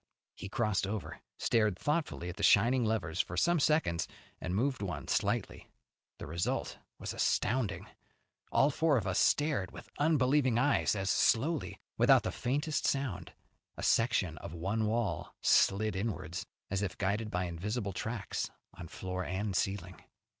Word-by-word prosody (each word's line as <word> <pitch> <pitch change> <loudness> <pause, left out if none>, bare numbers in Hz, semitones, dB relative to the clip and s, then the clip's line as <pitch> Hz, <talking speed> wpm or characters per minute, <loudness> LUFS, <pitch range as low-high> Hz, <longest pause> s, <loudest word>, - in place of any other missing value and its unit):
He - - -8
crossed 110 -4 0
over, 105 -1 -5 0.2
stared 110 -5 +2
thoughtfully 150 - -1
at 90 - -7
the - - -5
shining 120 +6 +5
levers 110 -7 0
for 90 - -7
some 175 -1 +3
seconds, 140 - +2 0.3
and 90 0 -3
moved 125 +1 0
one 85 -9 -4
slightly. - - -1 0.5
The - - -7
result 85 +4 -2 0.2
was - - -5
astounding. 100 -7 0 0.7
All 140 +2 +4
four 155 -1 +2
of 110 - -1
us 95 -1 +1
stared 145 - +2
with - - -12
unbelieving 140 -4 +3
eyes 145 -3 +2
as 95 -1 0
slowly, 145 - +1 0.2
without - - +6
the - - -2
faintest 145 +4 -1
sound, 120 -12 -2 0.4
a - - -6
section 100 -8 +2
of 85 - -8
one 100 +6 -1
wall 105 -8 -2
slid 105 +1 +3
inwards, 95 -5 -3 0.2
as 100 0 0
if 95 -3 -3
guided 105 +3 -1
by 90 -2 -1
invisible 100 +5 -3
tracks 110 +3 -3 0.2
on 85 - -9
floor 90 +2 -4
and 95 +2 -2
ceiling. 95 -1 -2
105 Hz, 150 wpm, -32 LUFS, 90-125 Hz, 0.7 s, without